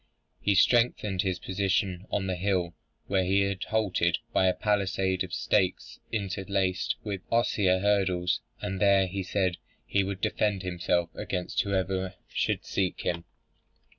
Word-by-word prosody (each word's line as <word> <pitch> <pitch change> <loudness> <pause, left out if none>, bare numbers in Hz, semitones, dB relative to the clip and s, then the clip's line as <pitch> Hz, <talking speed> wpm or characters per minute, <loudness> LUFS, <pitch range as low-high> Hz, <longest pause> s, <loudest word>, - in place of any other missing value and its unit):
He 100 - +2
strengthened 105 -3 +3
his 95 -2 -1
position 95 0 -1
on 100 - -1
the 95 -1 -1
hill 90 -2 0 0.3
where 95 -1 +1
he 95 +2 +3
had 100 -1 -1
halted, 95 -6 +1 0.2
by 95 - +4
a 90 - +4
palisade 95 -3 +1
of 90 - -7
stakes 90 0 0
interlaced 95 -2 -1
with 100 -3 -4
osier 105 -5 +3
hurdles, 95 -4 +1 0.2
and 95 0 -3
there, 100 -1 +5
he 95 +1 -3
said, 95 -1 0 0.3
he 100 - +1
would 95 -1 -4
defend 100 0 0
himself 90 -1 0
against 90 -1 -2
whoever 95 -1 -1
should - - -1
seek 95 -2 -1
him. 85 -1 -2
95 Hz, 140 wpm, -28 LUFS, 90-100 Hz, 0.3 s, there